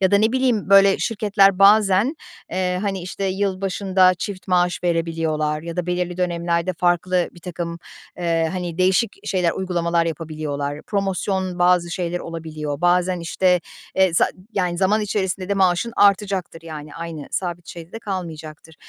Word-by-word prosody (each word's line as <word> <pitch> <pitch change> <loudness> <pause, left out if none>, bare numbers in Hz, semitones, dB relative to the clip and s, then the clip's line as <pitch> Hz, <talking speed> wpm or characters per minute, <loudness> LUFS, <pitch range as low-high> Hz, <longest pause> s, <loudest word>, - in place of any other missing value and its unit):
ya 190 -1 +3
da 200 - +5
ne 220 +2 +2
bileyim, 255 -7 +1
böyle 195 0 +6
şirketler 200 -3 +2
bazen, 205 - +5 0.4
eee, 180 -1 -1
hani, 195 -3 -2
işte 185 +2 -5
yılbaşında 190 -1 +1
çift 185 +2 -6
maaş 180 -1 +2
verebiliyorlar 160 -3 -1
ya 170 +1 -7
da 180 -1 -2
belirli 180 0 -2
dönemlerde 170 0 0
farklı 175 +1 +1
birtakım, 170 -1 -6 0.4
eee, 165 -2 +1
hani, 175 -2 -4
değişik 190 +4 +2
şeyler, 180 -3 +1
uygulamalar 170 -2 0
yapabiliyorlar. 150 -2 -4
Promosyon, 190 -2 -2
bazı 175 -1 +3
şeyler 175 0 -2
olabiliyor. 155 -3 -5
Bazen, 180 0 +2
işte, 180 +2 +2 0.4
eee, 190 -3 +3
za - - +3 0.2
yani, 180 -4 -1
zaman 200 +4 +2
içerisinde 190 -3 -2
de 200 - +1
maaşın 190 +4 +2
artacaktır, 195 -4 +2
yani, 155 -2 -8
aynı 165 -3 -6
sabit 175 -2 -4
şeyde 170 0 -10
de 225 - -6
kalmayacaktır. 160 -6 -7
180 Hz, 145 wpm, -21 LUFS, 170-195 Hz, 0.4 s, böyle